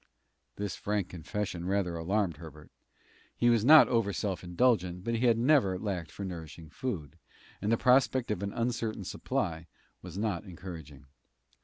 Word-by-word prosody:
This 100 -1 -3
frank 105 -3 -2
confession 90 +1 -4
rather 95 -3 0
alarmed 90 0 0
Herbert. 75 -2 -12 0.7
He 120 0 +4
was 115 -3 +3
not 155 +5 +9
over 115 -4 +1
self 100 -2 -3
indulgent, 90 -1 +1
but 115 - -2
he 125 +2 +2
had 115 -1 +4
never 120 -7 +3
lacked 90 -5 -3
for 100 - -7
nourishing 80 -3 -8
food, 90 - -5 0.4
and 105 +3 0
the 115 - +4
prospect 125 -1 +3
of 100 - -2
an 100 0 -2
uncertain 115 -3 -2
supply 85 -2 -3 0.3
was 90 0 -9
not 105 -4 -1
encouraging. 90 -7 -10
100 Hz, 155 wpm, -30 LUFS, 85-115 Hz, 0.7 s, not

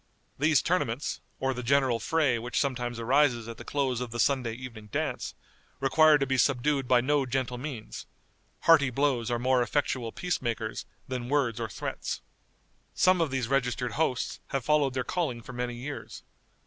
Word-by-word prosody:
These 150 0 +4
tournaments, 150 -8 -1 0.2
or 135 0 0
the 125 - -5
general 130 -1 +2
fray 145 -7 +1
which 120 +2 -2
sometimes 120 -4 -1
arises 120 -1 +2
at 115 -1 -7
the - - -9
close 130 -4 -1
of 125 - -3
the 120 +1 -6
Sunday 125 -4 +2
evening 115 -3 -9
dance, - - -3 0.4
require 150 +3 +5
to 140 - 0
be 130 -1 0
subdued 135 +1 +2
by 125 -1 +5
no 140 +1 +1
gentle 125 -1 -2
means: 125 -6 -7 0.5
hearty 155 -5 +6
blows 125 -3 0
are 120 - +1
far 120 - -6
more 130 -1 +3
effectual 120 -2 -1
peace 180 +7 -2
makers 115 -3 -3 0.2
than 125 -2 -4
words 135 -6 +1
or 115 -2 -3
threats. - - -4 0.7
Some 185 -1 +4
of 165 - +1
these 130 -3 -1
registered 125 -2 0
hosts 140 -5 -1
have 135 -3 -3
followed 145 -3 +2
their 130 - 0
calling 130 -10 -2
for 130 - -9
many 120 0 -3
years. 135 +4 -7
130 Hz, 175 wpm, -28 LUFS, 120-145 Hz, 0.7 s, hearty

